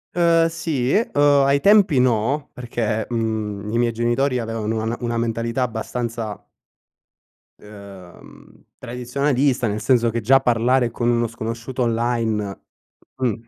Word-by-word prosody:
Uhm 170 -1 +4
sì, 145 -6 -2
uhm, 210 -9 +1 0.2
ai 140 +1 +3
tempi 200 -9 +5
no, 130 +4 +1
perché, 115 -3 -3
mhmm, 110 -3 -3
i 115 - 0
miei 120 -1 +2
genitori 120 +3 0
avevano 110 -1 -3
una 115 +2 -2
una 120 -1 -2
mentalità 115 +2 -2
abbastanza 115 -2 -4 1.2
uhm, 100 -4 -14 0.2
tradizionalista, 125 +1 0
nel 105 +1 -3
senso 120 -2 +3
che 115 +1 -2
già 135 +5 +5
parlare 120 0 +2
con 120 +1 -1
uno 120 -1 +1
sconosciuto 115 +3 -5
online, 115 -3 -1 0.6
mh. 125 -4 0
120 Hz, 125 wpm, -21 LUFS, 110-130 Hz, 1.2 s, tempi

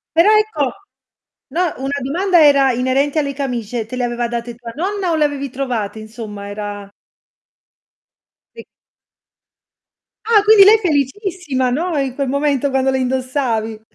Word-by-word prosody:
Però 335 +4 +5
ecco, 430 -8 +2 0.9
no, 350 -1 0
una 275 +2 -3
domanda 345 +5 +2
era 280 -2 +5
inerente 265 +5 0
alle 280 -2 -2
camicie, 245 -5 -3
te 255 - -7
le 250 - -2
aveva 240 0 -1
date 235 0 -5
tua 235 -1 -9
nonna 375 +3 -2
o - - +1
le 310 - +2
avevi 280 -1 -3
trovate 245 -5 -3
insomma? 215 -2 -8
Era 205 -1 -6 1.7
Sì. 465 - -10 1.6
Ah, 440 -2 +4
quindi 425 -1 +7
lei 420 +3 +7
felicissima, 305 - -1
no, 320 +6 -1
in 270 -2 -1
quel 275 -1 -2
momento 280 0 0
quando 265 0 +1
le 265 - +1
indossavi. 255 -4 -2
270 Hz, 140 wpm, -18 LUFS, 240-320 Hz, 1.7 s, quindi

